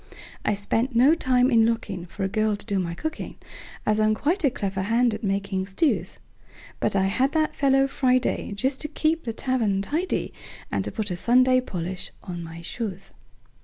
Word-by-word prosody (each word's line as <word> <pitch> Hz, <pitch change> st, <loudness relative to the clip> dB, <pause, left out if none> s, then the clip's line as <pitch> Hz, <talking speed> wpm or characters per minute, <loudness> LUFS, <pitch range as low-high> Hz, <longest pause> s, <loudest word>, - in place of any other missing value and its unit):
I 210 Hz, -, +1 dB
spent 225 Hz, +5 st, -1 dB
no 260 Hz, +6 st, +6 dB
time 255 Hz, -4 st, +2 dB
in 230 Hz, -2 st, +5 dB
lookingFor 205 Hz, -5 st, -2 dB
a -, -, +2 dB
girl 215 Hz, +1 st, +1 dB
to 205 Hz, -, -8 dB
do 200 Hz, -1 st, 0 dB
my 170 Hz, -2 st, -2 dB
cooking, 315 Hz, -, -5 dB, 0.5 s
As 215 Hz, 0 st, +2 dB
I'm 215 Hz, 0 st, +3 dB
quite 330 Hz, -, 0 dB
a 280 Hz, -, +5 dB
clever 195 Hz, -5 st, -3 dB
hand 230 Hz, +4 st, +2 dB
at 215 Hz, +2 st, -6 dB
making 195 Hz, -1 st, -1 dB
stews; 280 Hz, -, 0 dB, 0.6 s
But -, -, 0 dB
I 195 Hz, -, +3 dB
had 255 Hz, +8 st, +1 dB
that 310 Hz, -1 st, +1 dB
fellow 270 Hz, -1 st, +4 dB
Friday, 255 Hz, -5 st, +1 dB
Just 260 Hz, +6 st, -1 dB
to 300 Hz, -, -2 dB
keep 320 Hz, +1 st, 0 dB
the 230 Hz, -, -2 dB
tavern 220 Hz, -6 st, 0 dB
tidy, 325 Hz, -, -2 dB, 0.4 s
And -, -, 0 dB
to -, -, -3 dB
put 210 Hz, -4 st, -3 dB
a -, -, -1 dB
Sunday 255 Hz, +6 st, +4 dB
polish 180 Hz, -5 st, -5 dB
on 175 Hz, -2 st, -6 dB
my 165 Hz, 0 st, -9 dB
shoes. 195 Hz, -1 st, -5 dB
225 Hz, 185 wpm, -25 LUFS, 195-260 Hz, 0.6 s, no